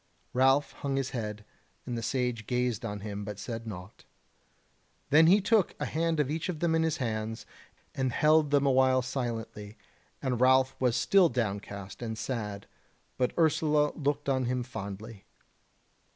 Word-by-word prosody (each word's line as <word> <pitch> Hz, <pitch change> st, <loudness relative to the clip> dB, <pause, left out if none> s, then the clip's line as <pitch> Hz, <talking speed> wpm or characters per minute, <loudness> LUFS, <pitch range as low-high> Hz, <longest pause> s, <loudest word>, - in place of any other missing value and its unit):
Ralph 135 Hz, +3 st, +3 dB
hung 140 Hz, -1 st, -2 dB
his 135 Hz, -1 st, -1 dB
head, 105 Hz, -3 st, -5 dB, 0.4 s
and 125 Hz, -, -4 dB
the 115 Hz, -, -3 dB
Sage 125 Hz, -3 st, -2 dB
gazed 125 Hz, -1 st, 0 dB
on 105 Hz, -3 st, -4 dB
him, 105 Hz, 0 st, -5 dB
but 105 Hz, 0 st, -6 dB
said 115 Hz, +1 st, -6 dB
naught. 95 Hz, -1 st, -9 dB, 1.1 s
Then 160 Hz, +3 st, +7 dB
he 195 Hz, +5 st, +6 dB
took 210 Hz, -1 st, +2 dB
a -, -, -1 dB
hand 165 Hz, 0 st, 0 dB
of 145 Hz, -1 st, +1 dB
each 160 Hz, +3 st, -2 dB
of 165 Hz, -4 st, -3 dB
them 170 Hz, -1 st, +1 dB
in 160 Hz, -, +3 dB
his 160 Hz, -2 st, 0 dB
hands, 110 Hz, -2 st, -3 dB, 0.5 s
and 130 Hz, -1 st, -1 dB
held 155 Hz, +2 st, +4 dB
them 145 Hz, -1 st, +3 dB
a 135 Hz, -, +4 dB
while 130 Hz, -1 st, +4 dB
silently, 115 Hz, -5 st, -5 dB, 0.4 s
and 125 Hz, -3 st, -2 dB
Ralph 130 Hz, 0 st, +4 dB
was 125 Hz, -3 st, +2 dB
still 175 Hz, +8 st, +4 dB
downcast 100 Hz, -4 st, -4 dB
and 110 Hz, -2 st, -4 dB
sad, 105 Hz, -4 st, -4 dB, 0.5 s
but 125 Hz, -1 st, +2 dB
Ursula 150 Hz, -2 st, +3 dB
looked 145 Hz, 0 st, -2 dB
on 130 Hz, -2 st, +1 dB
him 125 Hz, +1 st, -1 dB
fondly. 105 Hz, -3 st, -8 dB
125 Hz, 165 wpm, -29 LUFS, 110-145 Hz, 1.1 s, Then